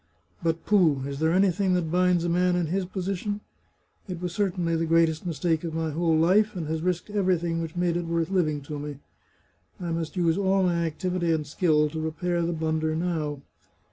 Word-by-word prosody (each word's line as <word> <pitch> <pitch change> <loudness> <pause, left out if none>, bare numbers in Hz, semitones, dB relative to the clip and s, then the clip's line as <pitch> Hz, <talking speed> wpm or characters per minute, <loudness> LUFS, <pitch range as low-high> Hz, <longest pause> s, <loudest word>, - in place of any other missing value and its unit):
But 165 0 -1
pooh! 165 -10 +3
is 140 0 -5
there 160 +1 +2
anything 190 0 +2
that 165 -3 -1
binds 180 -1 +3
a - - 0
man 180 +1 +2
in 175 -1 +1
his 185 +4 -1
position? 195 +2 -3 0.7
It 180 -3 -5
was 180 -1 -4
certainly 180 -4 0
the 165 0 0
greatest 165 +1 +2
mistake 165 -1 0
of 165 -2 -4
my 160 -1 -1
whole 165 +1 +1
life, 195 +6 +3
and 170 -3 -3
has 160 0 -2
risked 180 +3 -2
everything 175 -4 +1
which 165 0 -5
made 175 -1 +1
it 175 -1 -2
worth 165 +1 -1
living 155 -6 +1
to 145 +1 -6
me. 145 -1 -6 0.8
I 175 -2 -3
must 165 +1 -3
use 170 +1 +2
all 195 0 +2
my 170 -2 +1
activity 175 +1 -1
and 155 -2 0
skill 150 0 +2
to 160 0 -4
repair 170 +2 -1
the 170 +1 0
blunder 160 -1 -1
now. 160 -4 -2
170 Hz, 200 wpm, -26 LUFS, 160-180 Hz, 0.8 s, pooh